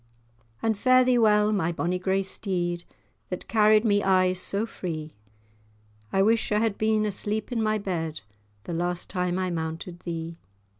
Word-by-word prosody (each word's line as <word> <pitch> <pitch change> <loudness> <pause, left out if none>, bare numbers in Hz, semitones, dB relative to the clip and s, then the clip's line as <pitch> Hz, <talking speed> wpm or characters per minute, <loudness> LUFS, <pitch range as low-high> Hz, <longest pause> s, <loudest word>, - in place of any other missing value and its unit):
And 225 -1 +2
fare 255 +4 +5
thee 250 -1 +3
well, 210 -1 +4
my 175 -5 +1
bonny 175 +2 -1
grey 190 +1 +1
steed, 175 -3 -3 0.4
That 180 - -5
carried 215 0 +4
me 205 -2 +3
aye 185 -1 +3
so 200 +3 -2
free; 160 -8 -6 1.0
I 195 - +3
wish 225 +2 +2
I 210 - +3
had 220 -1 +1
been 215 0 +2
asleep 210 +3 -2
in 235 -2 0
my 215 0 +1
bed, 165 -6 -3 0.4
The 170 - -5
last 175 +1 -2
time 180 -1 -1
I 185 -1 -1
mounted 165 +1 -4
thee. 165 -1 -6
190 Hz, 160 wpm, -26 LUFS, 175-215 Hz, 1.0 s, fare